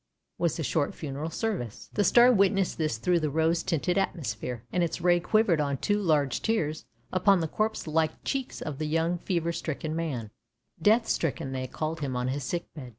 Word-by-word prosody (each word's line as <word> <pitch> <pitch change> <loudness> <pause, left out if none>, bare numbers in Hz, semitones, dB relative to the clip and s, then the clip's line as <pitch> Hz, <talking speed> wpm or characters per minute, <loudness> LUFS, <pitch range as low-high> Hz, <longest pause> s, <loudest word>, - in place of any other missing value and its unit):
" - - -54
was 170 -3 +1
the 160 - -2
short 145 0 0
funeral 150 +1 -4
service. 165 - -4
The 205 - +2
star 240 +6 +7
witnessed 195 -4 +2
this 155 -8 0
through 175 +9 +2
the 155 -2 -1
rose 160 +3 +2
tinted 175 +4 0
atmosphere, 125 - -3
and 180 - +2
its 170 0 -1
ray 175 0 +4
quivered 185 -3 +2
on 140 -2 -1
two 205 +7 +1
large 150 -7 +1
tears 160 -9 -1 0.3
upon 190 +1 +4
the 165 - -1
corpse 215 +6 -1
like 160 0 0
cheeks 270 -2 -3
of 150 -3 -5
the 155 - -1
young 165 +3 0
fever 170 -2 -1
stricken 160 -1 -4
man 135 -10 -3 0.3
— 125 +8 -36
death 225 +1 +3
stricken 135 -4 -1
they 130 -1 -3
called 155 +5 -3
him 135 -4 -3
on 125 +1 -1
his 140 +1 -2
sick 170 +7 -2
bed. 135 -5 -8
160 Hz, 205 wpm, -28 LUFS, 145-180 Hz, 0.3 s, star